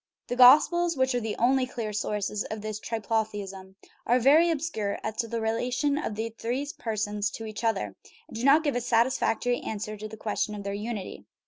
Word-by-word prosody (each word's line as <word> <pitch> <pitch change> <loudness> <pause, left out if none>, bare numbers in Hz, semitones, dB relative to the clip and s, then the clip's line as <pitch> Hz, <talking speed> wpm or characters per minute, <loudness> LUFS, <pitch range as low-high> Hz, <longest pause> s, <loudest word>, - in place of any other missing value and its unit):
The 245 - -1
Gospels, 305 +6 +6
which 260 0 +2
are 245 - +1
the 220 -2 -3
only 255 +2 +2
clear 225 -4 -5
sources 210 0 -2
of 215 -1 -6
this 215 0 -4
triplotheism, 205 -4 -3 0.3
are 245 - +4
very 295 +7 +5
obscure 280 -11 -2
as 220 0 -3
to 230 - -1
the 230 +1 -3
relation 250 +6 0
of 220 - -3
these 220 +1 -4
three 255 +5 -2
persons 210 -2 -1
to 225 - -7
each 215 +1 -7
other, 150 - -1 0.3
and - - -12
do 230 - -4
not 285 +4 +6
give 290 -4 0
a 245 - 0
satisfactory 245 0 +1
answer 215 0 -5
to 215 +1 -6
the 220 +1 -10
question 210 0 -2
of 205 - -7
their 200 0 -3
unity. 210 -1 -5
225 Hz, 200 wpm, -27 LUFS, 210-250 Hz, 0.3 s, Gospels